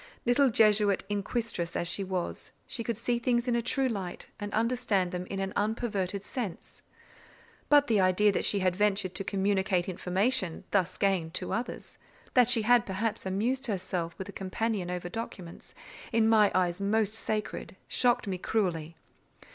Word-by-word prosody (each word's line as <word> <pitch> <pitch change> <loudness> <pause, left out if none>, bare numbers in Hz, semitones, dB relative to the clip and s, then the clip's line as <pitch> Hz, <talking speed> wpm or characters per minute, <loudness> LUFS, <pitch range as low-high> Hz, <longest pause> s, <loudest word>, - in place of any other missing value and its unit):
Little 255 +3 +4
Jesuit 210 -3 +4
inquisitress 205 -4 -2
as 170 - -1
she 185 +3 0
was, 185 -2 -4
she 235 - -3
could 230 -2 -2
see 240 +1 0
things 240 0 +1
in 245 - +2
a 235 - +1
true 260 +3 0
light, 195 -7 -5
and 205 0 -5
understand 225 -5 +1
them 180 0 -4
in 195 - -4
an 195 0 -3
unperverted 205 -3 -1
sense; 230 -9 -6 0.9
but 290 -1 +6
the 220 -5 +2
idea 185 +3 +4
that - - -1
she 200 - +2
had 185 -1 +2
ventured 200 -2 +1
to - - -3
communicate 190 -2 0
information, 185 +1 0
thus 185 -3 +1
gained, 185 -5 0
to - - -2
others; 240 +2 -5 0.3
that 250 -2 +5
she 230 -3 +4
had, 240 +1 +4
perhaps, 205 +1 -2
amused 245 +8 -1
herself 180 -4 -3
with 190 - -6
a - - -7
companion 195 0 -2
over 180 0 -3
documents, 180 -4 -8 0.4
in 225 -1 +3
my 215 -2 +5
eyes 180 0 +1
most 210 +1 +1
sacred, 215 -3 -3
shocked 245 -1 +2
me 190 -3 -3
cruelly. 170 -7 -1
205 Hz, 165 wpm, -29 LUFS, 185-230 Hz, 0.9 s, but